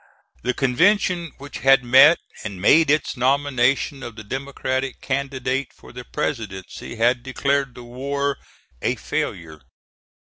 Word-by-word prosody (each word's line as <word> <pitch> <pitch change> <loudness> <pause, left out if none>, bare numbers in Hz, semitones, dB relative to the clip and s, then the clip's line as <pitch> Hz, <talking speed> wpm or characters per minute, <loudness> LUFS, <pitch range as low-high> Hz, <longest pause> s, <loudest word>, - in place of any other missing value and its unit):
The 125 0 -1
convention 170 +5 +2
which 140 +1 -9
had 135 -1 +5
met 130 +7 +7 0.3
and 100 -4 -6
made 155 - +5
its 150 0 +1
nomination 135 +1 +1
of 120 -4 -8
the 110 - -9
Democratic 130 +2 -3
candidate 135 0 -2
for - - -16
the 125 0 -8
presidency 110 -9 -5
had 120 +2 +2
declared 135 0 -1
the 125 - -10
war 140 +3 -2 0.4
a - - 0
failure. 80 -3 -4
130 Hz, 130 wpm, -22 LUFS, 120-140 Hz, 0.4 s, met